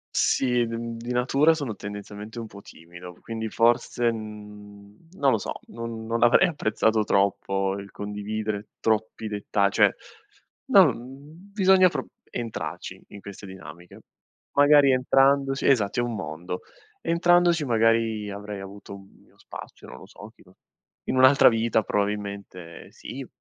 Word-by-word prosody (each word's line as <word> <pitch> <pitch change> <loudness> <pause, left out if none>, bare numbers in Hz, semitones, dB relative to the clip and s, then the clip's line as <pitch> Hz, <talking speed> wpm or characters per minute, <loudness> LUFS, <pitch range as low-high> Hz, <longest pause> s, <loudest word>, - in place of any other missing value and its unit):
Sì, 125 -3 +2
d - - -7
uhm, 115 0 -5
di 120 +2 -6
natura 135 +6 +3
sono 140 -8 -4
tendenzialmente 105 +2 -8
un 115 - -5
po' 100 -2 -12
timido, 85 0 -13
quindi 110 -1 -5
forse, 120 +1 +2
mhmm, 105 +2 -11
non 140 -7 +2
lo 110 - +2
so, - - -5 0.2
non 115 -1 -7
non 115 +1 -2
avrei 120 +10 +5
apprezzato 110 -6 +1
troppo 95 -1 0
il 100 - -10
condividere 105 +1 -5
troppi 110 0 -1
detta 100 -1 0
cioè, - - +4 0.8
no, - - +7
mhmm, 145 +10 -13
bisogna 190 -2 +5
pro 135 -6 -4 0.2
entrarci 115 -2 -6
in 100 - -12
queste 100 0 -10
dinamiche. 90 -2 -12 0.5
Magari 145 -1 +5
entrandoci 135 +1 +2
esatto, 120 -4 +2
è - - +2
un 120 -1 -3
mondo. 90 -2 -5 0.4
Entrandoci 175 -2 +3
magari 115 -2 +1
avrei 100 0 -7
avuto 100 +1 -10
un 95 0 -12
mio - - -27
spazio, - - -11
non - - -11
lo - - -13
so, 105 +2 -13
chi - - -21
lo 90 - -22 0.5
in - - -1
un'altra 130 +1 +7
vita 115 -1 +1
probabilmente 100 -5 -4
sì, - - -9
110 Hz, 145 wpm, -25 LUFS, 100-130 Hz, 0.8 s, no